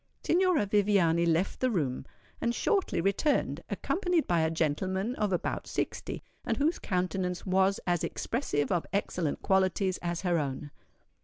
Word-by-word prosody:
Signora 360 - +3
Viviani 195 -5 +3
left 170 +3 +1
the 255 - +2
room, 140 - -1 0.3
and 235 0 0
shortly 390 - +1
returned, 200 - +1
accompanied 355 -3 0
by 170 -1 +2
a 160 0 +2
gentleman 185 +7 -1
of 210 -2 0
about 180 - -2
sixty, - - -3 0.2
and - - -1
whose 310 +4 +1
countenance 180 -1 -2
was 190 +1 +2
as 175 -2 +1
expressive 145 - -1
of 175 -2 0
excellent 180 -6 -1
qualities 190 0 +2
as 170 -1 -3
her 175 -3 +1
own. 145 0 -4
185 Hz, 145 wpm, -29 LUFS, 170-210 Hz, 0.3 s, Signora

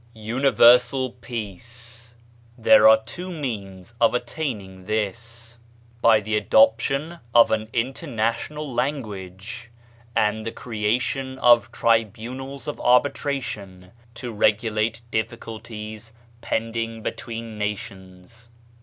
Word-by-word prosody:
UNIVERSAL 125 +2 +4
PEACE 115 +1 -7 0.4
There 110 -2 +7
are 110 0 +5
two 175 +11 -7
means 110 - -6
of 115 0 +4
attaining 120 -8 -4
this: 115 +3 -4 0.4
by 110 -2 +6
the 110 +1 -2
adoption 125 - +3 0.2
of 115 - +7
an 110 0 -1
international 130 +3 -2
language, 110 -4 -4 0.5
and 105 +1 +1
the 115 - -4
creation 125 +5 -2
of 120 -5 +5
tribunals 115 +5 -1
of 150 - -4
arbitration 125 -8 0 0.2
to 120 0 -6
regulate 110 +2 +1
difficulties 110 -1 -5 0.3
pending 115 0 -3
between 115 -2 -6
nations. 100 +1 -7
115 Hz, 90 wpm, -24 LUFS, 110-125 Hz, 0.5 s, There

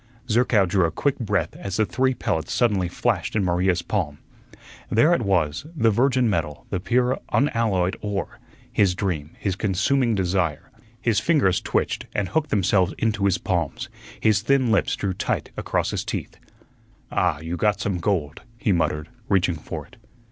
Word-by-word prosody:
Zerkow 115 -3 +3
drew 90 0 +2
a - - +1
quick 135 - -1
breath 105 -4 -1
as 100 -2 -4
the 110 - +3
three 130 +7 +1
pellets 80 -8 -2
suddenly 105 -7 +2
flashed 85 - -1
in 105 -3 +2
Maria's 90 0 +1
palm. 85 -7 -2 0.7
There 150 +10 +4
it 170 - +1
was, 90 - 0
the 115 -6 +3
virgin 125 +2 +2
metal, 80 -8 -2
the 95 - 0
pure, 125 +6 +1
unalloyed 110 -8 +1
ore, 105 -2 -4 0.3
his 95 -3 +3
dream, 85 -6 -3
his 95 -3 -2
consuming 110 +5 +1
desire. 90 -5 -1 0.3
His 115 -4 +2
fingers 140 - +2
twitched - - -1
and 100 -2 0
hooked 160 -1 0
themselves 95 -2 +2
into 105 -3 0
his 95 -2 +3
palms, 85 -7 -2 0.3
his 110 -2 +3
thin 130 0 +2
lips 110 - +2
drew 100 -2 -2
tight - - -2
across - - -1
his - - -2
teeth. - - -5 0.8
"Ah, 90 -5 +1
you 80 +3 -4
got 105 +2 +1
some 95 -3 -1
gold," 85 -5 -1 0.2
he 110 - 0
muttered, 80 -3 0 0.2
reaching 95 -3 +3
for 80 - -7
it. - - -20
100 Hz, 165 wpm, -24 LUFS, 90-115 Hz, 0.8 s, There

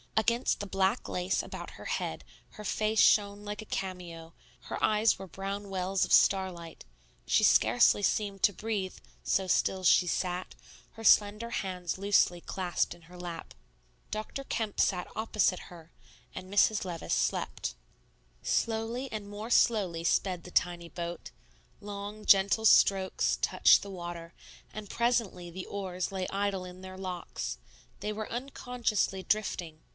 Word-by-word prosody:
Against 235 +3 +2
the 205 - -4
black 195 +4 0
lace 180 +1 0
about - - -8
her - - -9
head - - -3 0.3
her 210 - -10
face 215 +2 0
shone 205 -1 +4
like 210 +1 -5
a - - -10
cameo, 170 -3 -5 0.3
her - - -6
eyes 215 +1 +3
were 195 - -8
brown 195 +2 -5
wells 190 0 0
of - - -9
starlight; 185 -4 +2 0.4
she - - +3
scarcely 120 - +5
seemed 200 -2 0
to 205 - +5
breathe, 205 -2 -3 0.3
so 190 -1 +1
still 185 +1 +1
she 180 0 +5
sat, 180 +1 -2 0.4
her 225 - -11
slender 210 +2 +4
hands 180 -3 -3
loosely 190 -3 +2
clasped 180 -1 -1
in 170 - -20
her 180 +2 -14
lap. 175 -2 -7 0.6
Dr. 215 +6 -5
Kemp 225 -6 -3
sat 180 -2 +2
opposite 215 -4 0
her 165 -2 -13 0.4
and 185 +1 -8
Mrs. 205 +1 +3
Levice 175 -3 -4
slept. - - -1 0.7
Slowly 230 +4 -1
and 210 -2 -5
more 210 +2 -6
slowly 190 -9 +3
sped 180 0 +1
the 180 - -11
tiny 175 -1 0
boat; 170 0 -6 0.5
long 205 +1 -7
gentle 200 +3 +4
strokes 195 -2 +4
touched - - +5
the 200 - -8
water; 175 -2 -7 0.4
and 210 -2 -7
presently 230 -7 0
the 185 +2 -6
oars 185 -3 -4
lay 190 -1 -3
idle 195 -2 -1
in 180 0 -11
their 185 0 -9
locks, 185 -2 -5 0.4
they 210 - -2
were 215 0 -5
unconsciously 240 -6 -2
drifting. 175 -7 -2
195 Hz, 145 wpm, -30 LUFS, 180-210 Hz, 0.7 s, scarcely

